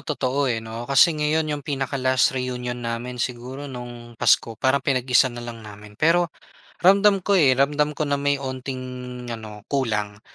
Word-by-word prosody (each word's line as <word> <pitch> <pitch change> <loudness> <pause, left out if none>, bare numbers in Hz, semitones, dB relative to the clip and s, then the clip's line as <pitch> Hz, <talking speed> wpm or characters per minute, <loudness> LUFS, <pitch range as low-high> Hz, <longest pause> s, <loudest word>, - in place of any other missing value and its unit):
totoo 140 -2 -1
eh, 115 - 0
'no. 115 +2 -7
Kasi 140 +5 +6
ngayon 155 0 0
yung 145 - -3
pinaka-last 135 -3 +1
reunion 125 -1 -3
namin 120 +1 -4
siguro 130 +4 -4
nung 120 -2 -9
Pasko. 115 0 +2
Parang 130 +3 +2
pinag-isa 130 -1 +3
na 120 -1 -8
lang 115 -1 -8
namin. 105 -1 -13
Pero 165 +1 +3 0.5
ramdam 195 0 +5
ko 200 - +1
eh, 140 -9 +5
ramdam 150 +2 +1
ko 155 - 0
na 140 -1 -1
may 145 0 +2
onting 130 -1 -5 0.5
ano 105 -2 -9
kulang. 105 -7 -2
130 Hz, 160 wpm, -23 LUFS, 120-145 Hz, 0.5 s, Kasi